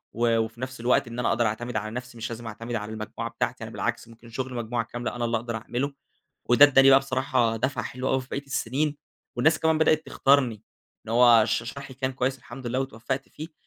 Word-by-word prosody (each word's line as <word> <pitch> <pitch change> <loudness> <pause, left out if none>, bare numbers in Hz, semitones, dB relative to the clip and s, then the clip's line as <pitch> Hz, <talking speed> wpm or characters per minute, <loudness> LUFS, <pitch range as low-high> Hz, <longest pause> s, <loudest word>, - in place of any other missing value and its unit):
و 115 -1 +2
وفي 110 +2 -3
نفس 130 0 -5
الوقت 120 +1 +2
إن 120 +1 -6
أنا 125 - +1
أقدر 120 +1 +2
أعتمد 115 +3 -3
على 110 0 -2
نفسي 125 +1 -7
مش 115 +1 -4
لازم 115 0 -7
أعتمد 115 +2 -5
على 105 -1 -4
المجموعة 110 -1 -5
بتاعتي - - -3
أنا - - -7
بالعكس - - -3
ممكن 115 0 -15
شغل 130 +2 -4
مجموعة 120 0 -2
كاملة 120 +1 -5
أنا 120 - -1
اللي 115 0 +1
أقدر 115 0 -4
أعمله، 125 +6 -3 0.5
وده 125 +4 +8
ادّاني 135 -1 +6
بقى 135 0 +8
بصراحة 130 -4 0
دَفعة 120 0 -1
حلوة 130 +3 -3
أوي 130 0 +2
في 130 - -14
بقية 140 - -4
السِنين 140 +2 -1 0.4
والناس 155 +5 +3
كمان 160 -1 +2
بدأت 155 0 +3
تختارني. 130 -6 +2 0.4
إن 110 - -4
هو 120 -2 +6
ش - - 0
شرحي 135 +3 -8
كان 130 0 -2
كويس 130 +1 -1
الحمد 125 0 -9
لله 125 +2 -1
واتوفّقت 135 +1 -4
فيه. 155 +1 -9
120 Hz, 220 wpm, -26 LUFS, 115-135 Hz, 0.5 s, وده